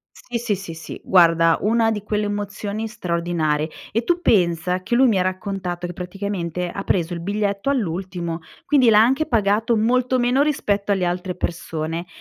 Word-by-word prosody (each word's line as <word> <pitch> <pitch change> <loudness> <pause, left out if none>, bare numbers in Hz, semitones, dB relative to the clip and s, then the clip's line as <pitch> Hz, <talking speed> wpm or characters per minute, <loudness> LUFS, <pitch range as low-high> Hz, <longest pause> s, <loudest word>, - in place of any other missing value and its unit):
Sì, 240 -1 -5 0.2
sì, 180 -4 -8
sì, 165 - -9
guarda, 165 -2 +5
una 225 +1 +2
di 210 -2 -3
quelle 210 0 -1
emozioni 205 +1 -3
straordinarie. 170 -6 -1 0.2
E 230 +3 +1
tu 350 +4 +1
pensa 180 - +2
che 235 - -1
lui 260 +2 +5
mi 200 -4 +2
ha - - +2
raccontato 185 -2 -3
che 175 - -6
praticamente 180 -1 -4
ha 195 - -5
preso 175 -1 0
il 170 - -5
biglietto 200 +4 -1
all'ultimo, 175 -7 -2 0.2
quindi 265 -5 +4
l'ha 210 0 +6
anche 265 +7 +3
pagato 220 0 +2
molto 250 +3 +2
meno 250 +3 +3
rispetto 205 -9 0
alle 190 -2 +1
altre 180 +1 -2
persone. 165 -1 -3
195 Hz, 165 wpm, -22 LUFS, 175-225 Hz, 0.2 s, l'ha